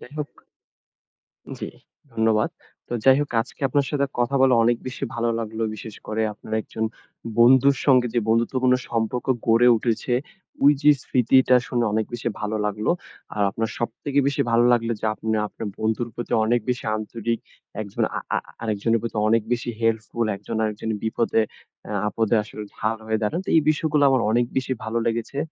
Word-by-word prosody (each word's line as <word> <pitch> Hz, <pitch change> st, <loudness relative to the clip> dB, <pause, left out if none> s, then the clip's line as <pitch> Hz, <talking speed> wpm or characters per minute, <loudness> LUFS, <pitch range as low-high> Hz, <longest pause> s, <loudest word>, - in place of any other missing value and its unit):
যাই 125 Hz, -, -13 dB
হোক 150 Hz, -, -3 dB, 1.3 s
জ্বি, -, -, -5 dB, 0.4 s
ধন্যবাদ। 110 Hz, -1 st, +2 dB, 0.4 s
তো -, -, -5 dB
যাই 135 Hz, 0 st, +7 dB
হোক, 145 Hz, -, -1 dB
আজকে 130 Hz, +6 st, -13 dB
আপনার 140 Hz, +2 st, +1 dB
সাথে 140 Hz, -2 st, +1 dB
কথা 120 Hz, +3 st, +1 dB
বলে 130 Hz, -1 st, +5 dB
অনেক 120 Hz, +1 st, +3 dB
বেশি 130 Hz, +1 st, -6 dB
ভালো 120 Hz, 0 st, 0 dB
লাগলো। 110 Hz, 0 st, -3 dB
বিশেষ 105 Hz, 0 st, -9 dB
করে 110 Hz, +1 st, -1 dB
আপনার 110 Hz, -, -9 dB
একজন 110 Hz, -, -5 dB, 0.6 s
বন্ধুর 130 Hz, +3 st, +6 dB
সঙ্গে 130 Hz, -3 st, +5 dB
যে 120 Hz, -, +3 dB
বন্ধুত্বপূর্ণ 125 Hz, +3 st, +3 dB
সম্পর্ক 115 Hz, +1 st, -1 dB, 0.2 s
গড়ে 115 Hz, +2 st, +5 dB
উঠেছে, 115 Hz, +2 st, -1 dB, 0.5 s
ওইযে 145 Hz, +1 st, +5 dB
স্মৃতিটা 130 Hz, +1 st, +4 dB
শুনে 120 Hz, -2 st, 0 dB
অনেক 110 Hz, 0 st, +1 dB
বেশি 120 Hz, 0 st, -3 dB
ভালো 105 Hz, +1 st, -2 dB
লাগলো। 105 Hz, +1 st, 0 dB, 0.4 s
আর 105 Hz, -, +1 dB
আপনার 110 Hz, +2 st, -2 dB
সবথেকে 135 Hz, +5 st, -1 dB
বেশি 140 Hz, -, +1 dB
ভালো 115 Hz, +1 st, +4 dB
লাগলো 115 Hz, -1 st, +2 dB
যে, -, -, -4 dB
আপনি 110 Hz, -, -10 dB, 0.2 s
আপনার 110 Hz, -, -7 dB
বন্ধুর 110 Hz, +2 st, 0 dB
প্রতি 120 Hz, -, -6 dB
অনেক 120 Hz, +2 st, +2 dB
বেশি 125 Hz, -, -2 dB
আন্তরিক, 115 Hz, +1 st, -3 dB, 0.4 s
একজন 100 Hz, -2 st, -2 dB
আ -, -, -1 dB, 0.2 s
আ -, -, +3 dB, 0.3 s
আরেকজনের 115 Hz, +1 st, +1 dB
প্রতি 115 Hz, -1 st, -4 dB
অনেক 115 Hz, +1 st, +4 dB
বেশি 120 Hz, 0 st, -3 dB
হেল্পফুল। 115 Hz, +1 st, 0 dB
একজন 105 Hz, +3 st, -6 dB
আরেকজন 110 Hz, +1 st, -3 dB
বিপদে 115 Hz, 0 st, +1 dB, 0.5 s
এ -, -, -5 dB, 0.2 s
আপদে 115 Hz, +1 st, +1 dB
আসলে 105 Hz, 0 st, -8 dB
ঢাল 110 Hz, +1 st, -1 dB
হয়ে 110 Hz, 0 st, 0 dB
দাঁড়ান। 105 Hz, +11 st, 0 dB
তো -, -, -4 dB
এই 160 Hz, -, +6 dB
বিষয়গুলো 150 Hz, -1 st, +1 dB
আমার 130 Hz, -3 st, +3 dB
অনেক 120 Hz, +1 st, +3 dB
বেশি 130 Hz, 0 st, 0 dB
ভালো 110 Hz, +1 st, -2 dB
লেগেছে। 115 Hz, +4 st, -2 dB
115 Hz, 170 wpm, -23 LUFS, 110-125 Hz, 1.3 s, যাই